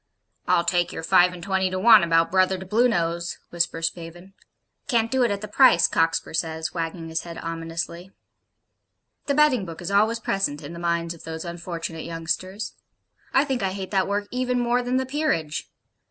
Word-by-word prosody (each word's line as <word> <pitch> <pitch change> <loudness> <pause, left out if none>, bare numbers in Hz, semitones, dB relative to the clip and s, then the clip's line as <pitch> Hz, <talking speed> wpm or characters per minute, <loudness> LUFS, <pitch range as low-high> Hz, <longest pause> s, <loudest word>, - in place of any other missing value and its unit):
'I'll 180 -1 +3
take 175 0 +1
your - - -6
five 180 +1 +5
and 175 -1 -10
twenty 190 0 0
to 185 - -3
one 230 +5 +7
about 165 0 +2
Brother 185 0 +3
to 190 - -8
Bluenose,' 175 -6 +1
whispers 170 -1 0
Spavin. 175 +3 -11 0.5
'Can't 230 -2 +1
do 265 0 +2
it 240 - +3
at 200 -1 -2
the 215 - -5
price,' 210 -5 +5
Cockspur 165 0 0
says, 160 -1 -2
wagging 165 0 -4
his 160 0 -2
head 170 -1 -9
ominously. 165 +2 -5 1.2
The 280 - +1
betting 295 -7 +4
book 165 -3 -8
is 175 +2 -5
always 215 +3 +3
present 195 -9 -1
in 145 - -8
the 170 - -8
minds 170 0 -1
of 165 - -14
those 160 +1 -6
unfortunate 170 -1 -5
youngsters. 170 +5 -4 0.6
I 270 - +4
think 265 -4 -2
I 190 -1 -1
hate 190 -1 -6
that 190 -2 +1
work 205 +1 -1
even 250 0 0
more 240 +1 +1
than 250 +1 -1
the 260 - 0
'Peerage.' 260 - -2
180 Hz, 185 wpm, -24 LUFS, 165-215 Hz, 1.2 s, one